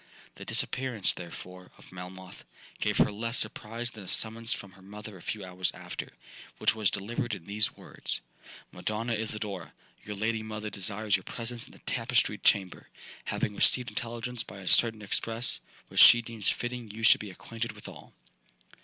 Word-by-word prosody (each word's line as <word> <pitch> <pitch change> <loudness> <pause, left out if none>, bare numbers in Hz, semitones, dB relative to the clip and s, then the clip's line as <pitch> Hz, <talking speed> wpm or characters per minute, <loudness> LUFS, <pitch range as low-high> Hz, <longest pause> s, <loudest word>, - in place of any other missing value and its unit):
The - - -10
disappearance, 125 -7 +1
therefore, 90 +1 -9
of - - -16
Melmoth, 90 0 -9 0.4
gave - - +1
her - - +5
less 115 +3 -1
surprise 115 +2 -2
than 105 -3 -10
a - - -12
summons 115 +3 0
from 100 - -3
her 95 +1 -18
mother 105 +2 -9
a 90 - -12
few 105 0 -4
hours 90 0 0
after, - - -6 0.5
which - - +3
was 110 -3 +2
delivered 115 +4 -2
in 85 - -11
these 105 +3 +1
words: - - -3 0.5
'Madonna 115 +2 -2
Isidora, 105 -6 -3 0.3
your 105 - -6
lady 110 +2 0
mother 110 -1 -5
desires 100 +1 0
your 95 - -1
presence 115 0 -4
in - - -16
the - - -15
tapestried - - +1
chamber—having 100 +2 0
received 125 +4 +6
intelligence 120 0 -2
by 100 - -10
a 95 - -10
certain 110 0 +5
express, 115 +4 +2 0.3
which - - +4
she 120 0 +10
deems 115 -3 +1
fitting 120 -2 -3
you 110 +2 -7
should 110 - +7
be 105 - -6
acquainted 115 +5 -5
withal.' - - -11
110 Hz, 165 wpm, -30 LUFS, 95-115 Hz, 0.5 s, she